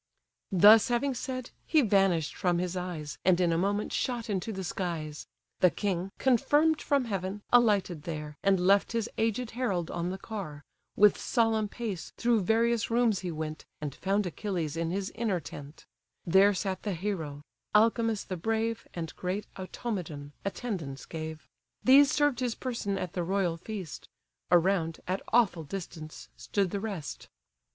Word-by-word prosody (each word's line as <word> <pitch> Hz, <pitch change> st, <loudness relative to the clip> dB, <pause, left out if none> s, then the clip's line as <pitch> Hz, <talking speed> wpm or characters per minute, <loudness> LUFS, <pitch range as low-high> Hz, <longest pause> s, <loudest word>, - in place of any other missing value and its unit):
Thus 205 Hz, +4 st, +8 dB
having 255 Hz, +3 st, +1 dB
said, 255 Hz, 0 st, -5 dB, 0.2 s
he 315 Hz, -, +5 dB
vanish'd 195 Hz, -7 st, +2 dB
from 175 Hz, -2 st, +1 dB
his 180 Hz, +1 st, -2 dB
eyes, 175 Hz, -5 st, -5 dB
And 185 Hz, -1 st, +4 dB
in 175 Hz, -2 st, +3 dB
a -, -, +1 dB
moment 205 Hz, +3 st, 0 dB
shot 235 Hz, -3 st, -1 dB
into 195 Hz, +3 st, -2 dB
the 190 Hz, -2 st, -5 dB
skies: 165 Hz, -5 st, -4 dB, 0.3 s
The 180 Hz, -, +6 dB
king, 190 Hz, -1 st, -2 dB
confirm'd 295 Hz, +5 st, +3 dB
from 280 Hz, -3 st, +1 dB
heaven, 195 Hz, -1 st, -3 dB
alighted 205 Hz, -9 st, +4 dB
there, 150 Hz, -2 st, -6 dB
And 195 Hz, -1 st, +3 dB
left 200 Hz, +4 st, +4 dB
his 230 Hz, -2 st, 0 dB
aged 225 Hz, +2 st, 0 dB
herald 195 Hz, -9 st, -1 dB
on 170 Hz, 0 st, -2 dB
the 190 Hz, -, -4 dB
car, 190 Hz, -9 st, -7 dB, 0.3 s
With 210 Hz, -1 st, +5 dB
solemn 225 Hz, -3 st, +1 dB
pace 205 Hz, -5 st, -5 dB
through 235 Hz, -2 st, +2 dB
various 230 Hz, +3 st, +2 dB
rooms 230 Hz, -3 st, +2 dB
he 180 Hz, -, -4 dB
went, 155 Hz, -1 st, -5 dB, 0.2 s
And 150 Hz, -3 st, -4 dB
found 200 Hz, +5 st, 0 dB
Achilles 175 Hz, -4 st, -3 dB
in 165 Hz, 0 st, -1 dB
his 195 Hz, +2 st, -2 dB
inner 215 Hz, -6 st, -1 dB
tent: 145 Hz, -1 st, -10 dB, 0.4 s
There 195 Hz, +3 st, +5 dB
sat 190 Hz, 0 st, -2 dB
the 205 Hz, -, -2 dB
hero: 160 Hz, -6 st, -4 dB, 0.3 s
Alcimus 225 Hz, 0 st, +3 dB
the 185 Hz, -, -5 dB
brave, 225 Hz, +4 st, -1 dB
And 165 Hz, -2 st, -5 dB
great 185 Hz, +3 st, -3 dB
Automedon, 180 Hz, -7 st, -5 dB
attendance 190 Hz, -, -4 dB
gave: 160 Hz, -1 st, -7 dB, 0.4 s
These 275 Hz, +2 st, +7 dB
served 290 Hz, -5 st, +2 dB
his 245 Hz, -3 st, -1 dB
person 230 Hz, -6 st, -3 dB
at 180 Hz, -3 st, -4 dB
the 180 Hz, -, -1 dB
royal 185 Hz, -1 st, 0 dB
feast; 185 Hz, -3 st, -7 dB, 0.4 s
Around, 175 Hz, -2 st, +3 dB
at 185 Hz, +2 st, -1 dB
awful 210 Hz, -8 st, +3 dB
distance, 155 Hz, -1 st, -7 dB
stood 195 Hz, -3 st, -1 dB
the 200 Hz, -, -2 dB
rest. 195 Hz, -9 st, -6 dB
195 Hz, 160 wpm, -29 LUFS, 170-225 Hz, 0.4 s, Thus